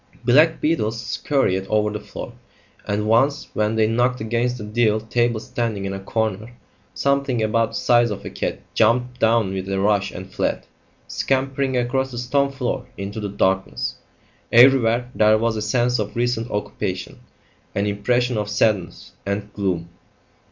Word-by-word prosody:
Black 150 +7 +5
beetles 115 -8 0
scurried 115 -5 0
over 105 0 +1
the 105 - -4
floor, - - -8 0.5
and 105 +1 -1
once, 135 +6 +2
when 105 +1 0
they 110 -1 +3
knocked 120 +3 +1
against 120 +3 -1
a - - -6
deal 110 0 +1
table 120 +1 0
standing 110 -3 -3
in 95 - -3
a 95 - -5
corner, 110 +2 -2 0.4
something 140 -4 +1
about 115 +1 +1
the - - -9
size 120 -1 +3
of 100 -1 -6
a - - -6
cat - - -3
jumped 125 +3 +2
down 110 -4 +2
with 95 0 -4
a 95 0 -1
rush 100 0 +2
and 95 +1 -9
fled, - - -1 0.4
scampering 135 0 0
across 130 +2 0
the 120 - -8
stone 140 +3 +1
floor 130 -3 -3
into 100 +2 -5
the 105 -1 -3
darkness. 95 -1 -1 0.5
Everywhere 125 -1 +5
there 110 -2 +4
was 115 0 0
a 110 - -3
sense 120 +3 +1
of 105 -1 -3
recent 120 -1 -1
occupation, 105 - -4 0.6
an 100 - +1
impression 120 +4 0
of 105 -1 -3
sadness 105 -4 0
and 100 +1 -4
gloom. 90 -4 -2
115 Hz, 160 wpm, -22 LUFS, 105-125 Hz, 0.6 s, Black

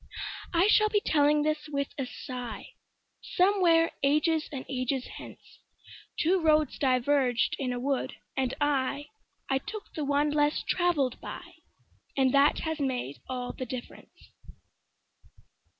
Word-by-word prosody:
I 345 +1 +4
shall 425 0 +5
be 420 - +3
telling 295 -4 +3
this 305 0 -1
with 280 -1 -2
a 270 -3 -3
sighSomewhere 330 - -1
ages 305 +3 +2
and 270 -3 -6
ages 255 0 -2
hence:Two 360 +3 -5
roads 310 -3 +2
diverged 255 -1 +2
in 260 -3 -1
a 245 - -3
wood, 270 +1 -1 0.2
and 260 -2 0
I—I 290 +2 -2
took 430 +8 -8
the 310 - -3
one 290 +1 +1
less 295 0 +1
traveled 315 -8 +1
by, - - -8 0.6
And 265 -1 +3
that 280 +1 +4
has 320 -1 -3
made 250 - -2
all 250 -1 -3
the - - -5
difference. 250 0 -9
285 Hz, 120 wpm, -29 LUFS, 260-315 Hz, 0.6 s, shall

